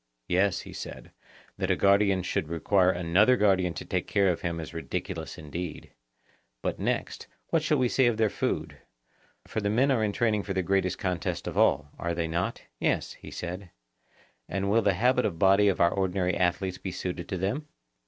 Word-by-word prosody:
Yes, 95 +2 +2
he - - -11
said; - - -8 0.5
that - - -1
a - - +4
guardian 100 -1 +3
should 95 -2 -1
require 90 +4 +2
another 95 +7 +3
guardian 95 -5 +2
to - - -6
take - - -2
care 100 -1 +3
of 85 - -4
him 85 -1 -2
is 80 0 -7
ridiculous 80 -4 -5
indeed. 80 +2 -6 0.7
But - - -2
next, - - -2 0.2
what 165 - +2
shall 155 -1 +2
we 130 -2 +2
say 130 +1 +3
of 120 -2 +1
their 110 -1 +3
food; - - -2 0.7
for 110 - -3
the 100 - 0
men 130 +6 +3
are 120 -5 +2
in 105 - +1
training 110 -1 +1
for 100 - -4
the 95 - +1
great 95 0 +1
contest 90 -5 -2
of - - -4
all—are 75 +4 +1
they 85 -1 -1
not? 85 +3 -2 0.2
Yes, - - 0
he - - -12
said. 90 +2 -6 0.8
And 100 +1 -1
will 115 +2 +4
the 100 -3 +2
habit 125 +5 +3
of 85 - -1
body 100 +3 +5
of 100 - +1
our 85 0 +5
ordinary 90 -1 0
athletes 90 +1 0
be 95 - -5
suited 90 -1 -5
to 95 - -2
them? 105 - -2
95 Hz, 195 wpm, -28 LUFS, 90-105 Hz, 0.8 s, body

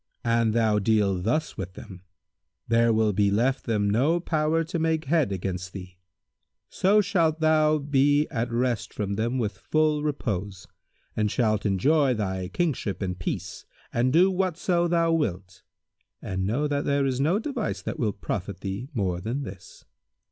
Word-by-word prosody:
An 115 -1 +2
thou 110 -1 +2
deal 100 -3 +1
thus 120 - -1
with 95 -3 -5
them, 95 -5 -11 0.7
there 115 0 +3
will 110 -1 +2
be 100 +1 +2
left 120 +7 +1
them 105 -3 +1
no 135 +12 +2
power 160 -1 0
to 165 +1 -4
make 160 0 0
head 155 -6 +2
against 90 -1 -4
thee; 90 -2 -10 0.7
so 205 +3 +3
shalt 170 -5 +1
thou 155 -1 +3
be 145 +1 +2
at 115 +1 -2
rest 115 -4 -1
from 100 -1 -2
them 115 +5 -1
with 105 -5 -2
full 155 -1 +1
repose, 105 -10 -3 0.5
and 105 -1 +1
shalt 110 -2 +1
enjoy 135 - +2
thy 95 -3 -2
kingship 120 - -2
in 90 -1 -2
peace 85 -2 -5 0.3
and 120 +2 +2
do 180 +6 +5
whatso 180 -1 0
thou 170 -1 +2
wilt; 95 - -2 0.6
and 95 0 -3
know 140 +8 0
that 145 0 -1
there 140 -1 +1
is 130 -1 -1
no 160 +7 +2
device 245 -1 -3
that - - -5
will 110 -4 +1
profit - - -5
thee 100 +7 -5
more 90 -5 -1
than 120 +8 -3
this." 95 -6 -11
120 Hz, 160 wpm, -26 LUFS, 100-155 Hz, 0.7 s, do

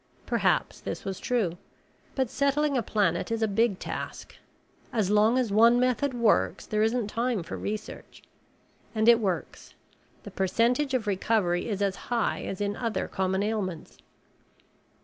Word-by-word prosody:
Perhaps - - 0
this - - -6
was 195 -1 -4
true. 195 -9 -1 0.6
But 265 -2 +1
settling 280 +1 +1
a 250 - +2
planet 200 -5 0
is 225 0 0
a - - +3
big 210 0 +1
task. - - -6 0.6
As 210 -4 0
long 215 +4 +4
as 245 -5 0
one 230 +4 +5
method 255 +1 +1
works 95 - +2
there 215 0 -1
isn't 225 +1 +1
time 230 -2 -1
for - - -6
research. 215 +1 -6 0.7
And 220 +1 +1
it 235 -1 +7
works 185 -8 -4 0.5
the - - -9
percentage 245 +8 +1
of 240 -4 -1
recovery 195 -2 0
is 205 -1 -1
as 195 -2 0
high 240 -2 0
as 195 - -5
in 205 0 -1
other 230 -1 -2
common 190 0 -1
ailments. 205 -6 -4
220 Hz, 150 wpm, -27 LUFS, 195-240 Hz, 0.7 s, it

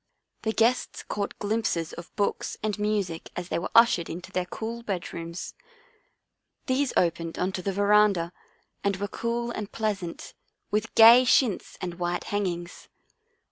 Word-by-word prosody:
The 220 - 0
guests 230 +3 +1
caught 200 -1 -4
glimpses 205 -6 -1
of 170 0 -10
books 205 - -1
and 215 -1 -1
music 205 -6 -1
as 175 0 -5
they - - 0
were 170 - -4
ushered 230 -8 +5
into 175 +2 -7
their 180 -1 -1
cool 230 +5 -5
bedrooms. 170 -4 -5 1.1
These 260 0 +1
opened 170 -1 0
on 185 +1 0
to 185 - -4
the 195 - -1
veranda 200 -3 +3 0.5
and 200 -1 +1
were 200 +2 -3
cool 235 +3 -2
and 210 -3 -5
pleasant, 200 -6 -3 0.4
with 215 +2 -1
gay 230 +3 +9
chintz 245 -4 +2
and 175 -1 -5
white 175 0 -1
hangings. 180 -4 -3
200 Hz, 145 wpm, -27 LUFS, 175-220 Hz, 1.1 s, gay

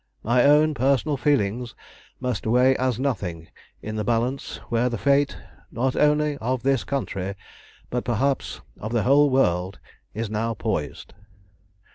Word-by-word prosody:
My 120 +2 +3
own 150 +2 +5
personal 140 +2 +1
feelings 120 -4 0 0.4
must 125 -5 -3
weigh 125 +3 +4
as 130 -3 0
nothing 95 - -3 0.3
in 110 0 -5
the 105 - -1
balance 120 +5 -1
where 120 +1 +1
the 120 - -3
fate, 140 +3 +2 0.3
not 130 +3 -1
only 150 0 +2
of 125 +2 -2
this 135 -2 +2
country, 100 -8 -3 0.6
but 125 0 -1
perhaps 130 +4 -1 0.2
of 110 +3 -5
the 115 -3 +1
whole 145 +3 +5
world, 95 -8 +1 0.4
is 115 +1 -2
now 110 +2 -2
poised. 95 -11 -4
125 Hz, 140 wpm, -24 LUFS, 110-135 Hz, 0.6 s, own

